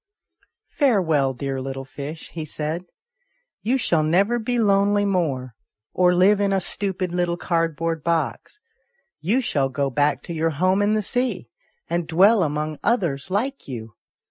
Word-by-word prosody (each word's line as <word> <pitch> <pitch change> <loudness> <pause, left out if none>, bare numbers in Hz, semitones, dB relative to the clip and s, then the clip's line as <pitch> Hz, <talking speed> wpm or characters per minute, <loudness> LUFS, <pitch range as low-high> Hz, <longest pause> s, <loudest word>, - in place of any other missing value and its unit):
" - - -33 0.3
Farewell, 170 - +2
dear 135 +1 -4
little 135 0 -5
fish," 145 +4 -8
he 165 - -5
said. 155 +3 -4 0.4
" - - -49 0.3
You 245 +5 +1
shall 170 -10 +1
never 195 +10 +2
be 245 +2 -1
lonely 205 -1 +3
more, 145 - -1 0.4
or 180 -1 +3
live 195 +3 +4
in 200 -1 +2
a 195 - +2
stupid 185 -1 -2
little 175 -1 0
card 165 -3 0
board 165 -1 -2
box; 170 - -2 0.6
you 215 +11 +1
shall 140 - 0
go 135 +1 -1
back 145 +1 +1
to 170 - -6
your 165 0 0
home 185 +4 +2
in 210 +1 +2
the 215 - 0
sea, 250 +5 -1 0.4
and 170 -1 -2
dwell 195 +6 +5
among 150 -1 -2
others 175 - 0
like 255 +9 -2
you. 115 -4 -7
170 Hz, 165 wpm, -23 LUFS, 150-200 Hz, 0.6 s, dwell